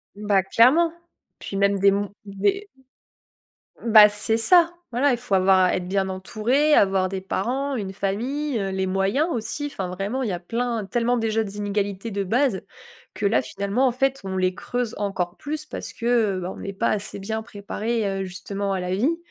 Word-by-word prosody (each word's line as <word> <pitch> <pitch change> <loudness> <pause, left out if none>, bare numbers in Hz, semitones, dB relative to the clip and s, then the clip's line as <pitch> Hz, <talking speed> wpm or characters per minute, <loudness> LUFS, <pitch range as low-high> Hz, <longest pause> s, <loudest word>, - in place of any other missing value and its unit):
Bah, 205 -2 +1
clairement, 280 - +4 0.5
puis 195 - -7
même 200 0 +2
des 200 0 +5
mon 200 0 -1
des 390 - -1 1.2
Ben 215 -2 +8
c'est 215 +2 0
ça. 340 +8 +5 0.2
Voilà, 265 +4 +2
il - - 0
faut 240 -4 -5
avoir 185 -1 +4
être 180 0 -2
bien 190 0 0
entouré, 230 +10 +1
avoir 190 -4 +4
des 190 0 -4
parents, 260 +8 -2
une 195 -4 -4
famille, 240 +7 -2
heu, 195 -1 -2
les 190 0 -1
moyens 195 - +1
aussi. 255 +5 -3
Enfin, 190 -10 -5
vraiment, 195 +8 -3
il 235 - -1
y - - -2
a 175 - -3
plein, 230 +3 -2
tellement 240 +4 0
déjà 225 -1 0
d'inégalités 205 +1 -3
de 200 0 -1
base 240 0 +1 0.5
que 205 - -4
là, 200 - +3
finalement, 200 +7 0
en - - +2
fait, 270 +1 0
on 190 0 -4
les 185 0 +1
creuse 245 +2 -3
encore 195 -4 -2
plus 305 +1 -4
parce - - -7
que, 230 - -7
heu, 225 -6 +2
ben, 180 +2 -4
on - - -9
est 195 - -5
pas - - 0
assez 205 -1 -3
bien 220 +3 -3
préparé, 220 +2 -3 0.2
heu, - - -1
justement 195 +2 -4
à 190 - -1
la 180 +1 -2
vie, 275 - +1
205 Hz, 195 wpm, -23 LUFS, 195-245 Hz, 1.2 s, Ben